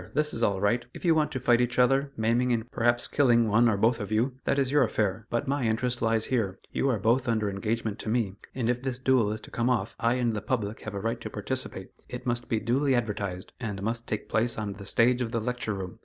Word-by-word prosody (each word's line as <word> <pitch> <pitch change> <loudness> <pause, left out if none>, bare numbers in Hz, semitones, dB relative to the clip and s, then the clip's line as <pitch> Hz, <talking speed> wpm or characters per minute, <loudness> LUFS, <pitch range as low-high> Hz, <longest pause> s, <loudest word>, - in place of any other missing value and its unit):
This 150 0 +1
is 115 - -3
all 100 -4 +2
right; 110 +5 +1
if - - -8
you 170 - +5
want 155 -1 +1
to 130 - -3
fight 120 -1 +3
each 125 0 -1
other, 135 +3 +3
maiming 120 +3 +2
and 120 +1 -1
perhaps 120 +1 +1
killing 120 -5 +3
one 110 +3 +4
or 105 - +1
both 115 +3 +2
of 105 -1 -5
you, 115 +5 +1
that 140 - +1
is 135 -2 +1
your 145 - +4
affair; 110 -2 0
but 120 - -1
my 140 -2 0
interest 120 +2 0
lies 115 -1 +2
here 110 -7 -1
you 135 - 0
are 125 - +2
both 115 +6 +2
under 110 -3 +1
engagement 110 +2 -2
to - - -4
me, 110 -4 0 0.2
and 125 -3 -1
if 125 0 0
this 130 -2 -3
duel 130 -5 +2
is 110 - -3
to - - -12
come 120 +1 0
off, 115 -3 0
I 115 +1 +2
and 120 -3 0
the 105 - -2
public 110 -2 -2
have 110 -1 -6
a - - -2
right 115 +3 -2
to 110 - -5
participate. 105 -2 -4 0.2
It 125 0 -7
must 120 -1 -1
be 110 - +1
duly 130 +5 +1
advertised, 100 -6 -3
and 105 -5 -4
must 115 +2 -2
take 105 - -3
place 115 +1 +1
on 105 -2 -3
the 100 0 -10
stage 125 +2 +3
of 120 - -1
the 115 - 0
Lecture 120 -1 -2
Room. 95 -2 -7
115 Hz, 260 wpm, -28 LUFS, 110-125 Hz, 0.2 s, you